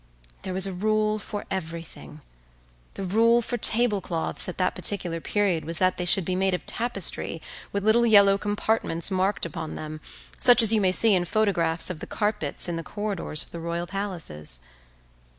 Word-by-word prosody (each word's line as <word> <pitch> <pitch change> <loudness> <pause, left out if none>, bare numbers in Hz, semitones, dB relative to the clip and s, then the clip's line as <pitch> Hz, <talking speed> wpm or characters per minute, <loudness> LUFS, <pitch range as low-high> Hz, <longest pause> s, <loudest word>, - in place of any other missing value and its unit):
There 185 - -5
was 190 0 +4
a 195 - -4
rule 215 +2 0
for 205 0 -6
everything. 165 -4 -7 0.7
The 195 - -5
rule 230 +5 +3
for 245 - -3
tablecloths 210 -9 0
at 180 - -7
that 185 -1 0
particular 175 -5 0
period 195 -5 0
was 165 0 0
that 185 +1 +1
they 180 - -3
should 180 0 +5
be 185 - -2
made 190 0 +1
of - - -8
tapestry 205 -7 -1 0.3
with 200 -1 -3
little 235 +2 +4
yellow 200 -2 +5
compartments 205 -4 -1
marked 190 +2 0
upon 160 -3 -6
them, 155 0 -7 0.4
such 245 -2 +6
as 225 0 +6
you 215 - +2
may 185 -2 +2
see 220 +3 +6
in 180 -2 +1
photographs 175 -4 +1
of 170 - -7
the - - -8
carpets 210 -10 -2
in 170 -1 -3
the 165 - -5
corridors 200 -5 -3
of - - -19
the 170 - -7
royal 170 +1 -3
palaces. 170 - -4
190 Hz, 180 wpm, -25 LUFS, 170-210 Hz, 0.7 s, such